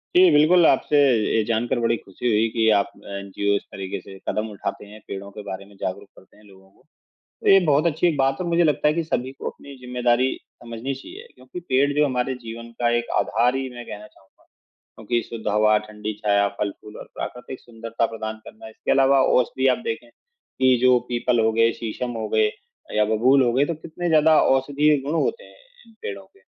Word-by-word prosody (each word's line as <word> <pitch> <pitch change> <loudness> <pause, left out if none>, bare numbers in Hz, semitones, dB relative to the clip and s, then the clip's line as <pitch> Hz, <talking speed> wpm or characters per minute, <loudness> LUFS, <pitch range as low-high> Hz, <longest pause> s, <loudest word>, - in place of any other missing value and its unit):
जी, 180 0 +7
बिल्कुल 160 +4 +5
आपसे 145 +1 +3 0.4
ये 110 - +3
जानकर 120 +2 0
बड़ी 115 0 +1
ख़ुशी 100 +6 -6
हुई 110 0 +3
कि 110 0 +1
आप 100 0 0 0.2
एनजीओ 100 +1 -2
इस 100 - -1
तरीके 95 -1 -6
से 95 - -12
कदम 110 +1 -2
उठाते 105 0 -5
हैं, 105 +1 -13
पेड़ों 100 0 -7
के 105 - -9
बारे 95 +1 -6
में 100 0 -19
जागरूक 100 +2 -4
करते 95 - -20
हैं 105 - -21
लोगों 95 -2 -19
को। - - -29 0.6
तो - - -1
ये 195 - +8
बहुत 150 +2 +3
अच्छी 165 +1 +1
एक 165 -4 +1
बात 135 0 +1
है 180 - -2
मुझे 170 0 +2
लगता 150 -1 +2
है 150 - +1
कि 170 - 0
सभी 130 -4 -2
को - - -6
अपनी 140 -1 -13
ज़िम्मेदारी 125 0 +1 0.3
समझनी 120 +3 -5
चाहिए 365 - -11
क्योंकि 360 - -10
पेड़ 140 - +1
जो 150 - +5
हमारे 130 0 -1
जीवन 115 0 -9
का 120 -1 +2
एक 120 0 -3
आधार 120 +3 +1
ही 135 0 -3
मैं 120 0 -8
कहना 105 +1 -8
चाहूँगा। 95 -2 -26 0.5
क्योंकि 115 +2 -1
शुद्ध 115 -2 -8
हवा, 105 +1 +3
ठंडी 105 0 -6
छाया, 100 -1 +3
फल-फूल 105 +1 -5
और - - -8
प्राकृतिक 125 +1 -7
सुंदरता 115 -1 -3
प्रदान 110 -1 -6
करना। 110 - -12
इसके 110 - -6
अलावा 135 0 +4 0.2
औषधि 130 +1 +1
आप - - -11
देखें 115 +1 -4
कि 130 - -1
जो 125 -1 +5
पीपल 120 0 +1
हो 110 - +2
गए, 115 +1 +3
शीशम 115 +3 -5
हो 110 - -3
गए 110 -1 +3 0.5
या 105 - +4
बबूल 130 +5 +4
हो 120 -2 +2
गए 135 +4 +3
तो 170 - -2
कितने 165 +3 -5
ज़्यादा 155 -1 +5
औषधीय 145 +3 +2
गुण 150 - -1
होते 465 +2 -2
हैं - - -18 0.3
इन 225 - -20
पेड़ों 100 -1 -6
के। - - -27
120 Hz, 210 wpm, -23 LUFS, 105-140 Hz, 0.6 s, ये